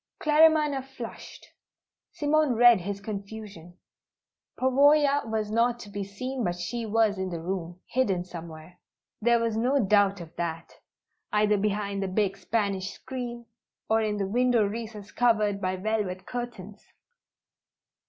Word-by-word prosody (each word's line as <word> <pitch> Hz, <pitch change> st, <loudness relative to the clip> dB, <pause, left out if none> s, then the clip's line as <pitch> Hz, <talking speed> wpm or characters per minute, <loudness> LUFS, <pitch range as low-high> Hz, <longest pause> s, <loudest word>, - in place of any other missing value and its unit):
Claremanagh 300 Hz, -3 st, +4 dB
flushed. 250 Hz, -4 st, -10 dB, 0.6 s
Simone 295 Hz, -3 st, +1 dB
read 240 Hz, -3 st, +6 dB
his 200 Hz, +2 st, -4 dB
confusion. 200 Hz, -4 st, -8 dB, 0.8 s
Pavoya 280 Hz, 0 st, +4 dB
was 215 Hz, -1 st, -2 dB
not 235 Hz, +2 st, +2 dB
to 205 Hz, -, -10 dB
be 200 Hz, 0 st, -3 dB
seen, 250 Hz, +6 st, -5 dB
but 175 Hz, -3 st, -1 dB
she 225 Hz, +6 st, -4 dB
was 215 Hz, -2 st, +2 dB
in 190 Hz, 0 st, -2 dB
the 170 Hz, -2 st, -4 dB
room, 175 Hz, 0 st, -4 dB
hidden 200 Hz, -9 st, 0 dB
somewhere; 170 Hz, 0 st, -10 dB, 0.4 s
there 235 Hz, +2 st, +4 dB
was 230 Hz, -1 st, -1 dB
no 255 Hz, +5 st, +2 dB
doubt 200 Hz, -2 st, +3 dB
of 165 Hz, -2 st, -11 dB
that; 165 Hz, -1 st, -4 dB, 0.6 s
either 210 Hz, 0 st, +3 dB
behind 200 Hz, -1 st, -1 dB
the 195 Hz, -, -1 dB
big 195 Hz, 0 st, 0 dB
Spanish 200 Hz, -2 st, -1 dB
screen, 240 Hz, 0 st, -7 dB, 0.5 s
or 225 Hz, 0 st, +4 dB
in 210 Hz, -1 st, -1 dB
the 200 Hz, -, -1 dB
window 240 Hz, +1 st, +2 dB
recess 215 Hz, -1 st, -6 dB
covered 215 Hz, -4 st, +2 dB
by 185 Hz, 0 st, -1 dB
velvet 190 Hz, -2 st, -2 dB
curtains. 235 Hz, -5 st, -7 dB
210 Hz, 135 wpm, -27 LUFS, 195-240 Hz, 0.8 s, read